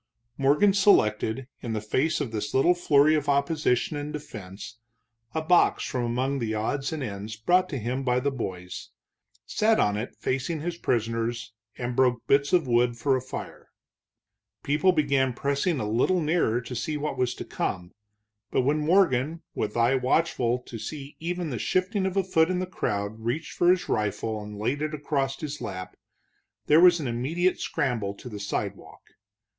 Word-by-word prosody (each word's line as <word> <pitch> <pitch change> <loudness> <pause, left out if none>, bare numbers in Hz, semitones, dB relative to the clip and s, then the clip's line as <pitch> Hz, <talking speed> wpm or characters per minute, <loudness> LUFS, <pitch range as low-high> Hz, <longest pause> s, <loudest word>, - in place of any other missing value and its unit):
Morgan 145 +10 +4
selected, 130 - +3 0.2
in 115 - -4
the 110 - -1
face 130 +9 0
of 140 -6 -3
this 105 -2 -3
little 150 +7 +5
flurry 155 -3 +4
of 150 -2 0
opposition 140 -1 +1
and 145 +1 -4
defense, 110 -7 -8 0.6
a 160 - 0
box 175 +2 +4
from 125 -2 -2
among 130 +4 -1
the 110 -2 -2
odds 135 +6 -1
and 155 -3 -3
ends 105 -1 -5
brought 180 +12 +2
him 130 -1 -2
by 125 -2 +1
the 140 +2 0
boys, 90 -8 -6 0.6
sat 220 +1 +2
on 105 0 +2
it 110 +4 -5
facing 135 +5 -2
his 170 +3 -3
prisoners 115 0 -1 0.2
and 120 0 -3
broke 125 -2 +2
bits 140 +1 +3
of 175 -4 +3
wood 120 -1 +2
for 135 +3 +2
a 130 - -1
fire. 130 - -8 0.9
People 150 +6 +3
began 140 -5 +1
pressing 140 +5 0
a 105 - -2
little 125 +12 +2
nearer 155 -7 +1
to 125 +1 -7
see 150 +6 -2
what 150 +1 -3
was 125 -1 0
to - - -7
come, 90 -1 -3 0.6
but - - +2
when 145 +4 +1
Morgan, 160 -2 +2
with 105 +2 -3
eye 120 +2 +4
watchful 130 -2 +1
to 115 - -8
see 140 +5 -7
even 175 -1 -3
the 120 - -3
shifting 190 +1 0
of 190 +1 -3
a 195 - +3
foot 165 -3 +2
in 185 - 0
the 185 - -1
crowd, 105 - -3
reached 120 +8 -3
for 175 - +2
his 180 0 +3
rifle 105 +1 -1
and 105 0 -8
laid 125 +8 -1
it 155 0 -2
across 140 -2 -2
his 145 -2 -5
lap, 90 -2 -6 0.7
there 155 +3 +6
was 175 -1 +7
an 150 - -4
immediate 155 +10 0
scramble 110 -7 -1
to 125 - -10
the 105 -3 -7
sidewalk. 100 - -5
135 Hz, 175 wpm, -26 LUFS, 115-155 Hz, 0.9 s, was